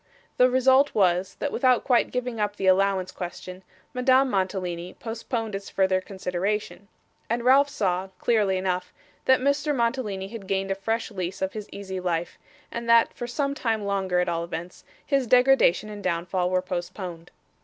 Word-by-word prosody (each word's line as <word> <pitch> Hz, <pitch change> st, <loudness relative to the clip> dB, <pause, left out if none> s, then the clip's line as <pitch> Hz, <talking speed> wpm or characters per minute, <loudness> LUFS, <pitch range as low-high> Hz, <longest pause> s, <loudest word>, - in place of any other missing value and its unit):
The 250 Hz, 0 st, +6 dB
result 260 Hz, +2 st, +4 dB
was, 185 Hz, -2 st, +2 dB
that 290 Hz, -, -3 dB
without 255 Hz, -2 st, +3 dB
quite 245 Hz, -3 st, +3 dB
giving 250 Hz, -2 st, -3 dB
up 205 Hz, -1 st, -1 dB
the 195 Hz, -, -3 dB
allowance 190 Hz, 0 st, +3 dB
question, 180 Hz, +1 st, -7 dB, 0.3 s
Madame 260 Hz, +1 st, +3 dB
Mantalini, 185 Hz, -2 st, -2 dB
postponed 225 Hz, -1 st, -4 dB
its 195 Hz, 0 st, -5 dB
further 190 Hz, -1 st, +1 dB
consideration; 195 Hz, +2 st, -3 dB, 0.4 s
and 235 Hz, +1 st, -1 dB
Ralph 275 Hz, +3 st, +5 dB
saw, 190 Hz, -8 st, -1 dB
clearly 210 Hz, -5 st, +2 dB
enough, 180 Hz, -1 st, -2 dB, 0.3 s
that 260 Hz, -1 st, +4 dB
Mr. 285 Hz, +2 st, +1 dB
Mantalini 230 Hz, -6 st, -1 dB
had 215 Hz, -3 st, -9 dB
gained 195 Hz, 0 st, -1 dB
a -, -, +3 dB
fresh 225 Hz, +4 st, -2 dB
lease 185 Hz, -1 st, -4 dB
of 190 Hz, -, -2 dB
his 210 Hz, -2 st, -7 dB
easy 190 Hz, -2 st, -6 dB
life, 175 Hz, -2 st, -2 dB, 0.3 s
and 235 Hz, 0 st, -5 dB
that, 230 Hz, 0 st, +5 dB
for 240 Hz, -, -6 dB
some 275 Hz, +3 st, -1 dB
time 225 Hz, -6 st, -1 dB
longer 190 Hz, -3 st, 0 dB
at 180 Hz, -, +1 dB
all 170 Hz, -1 st, -1 dB
events, 170 Hz, +1 st, -7 dB, 0.2 s
his 275 Hz, -4 st, +1 dB
degradation 250 Hz, -6 st, +4 dB
and 205 Hz, -1 st, -8 dB
downfall 180 Hz, +1 st, -1 dB
were 185 Hz, 0 st, +1 dB
postponed. 175 Hz, -1 st, -6 dB
200 Hz, 165 wpm, -25 LUFS, 185-240 Hz, 0.4 s, The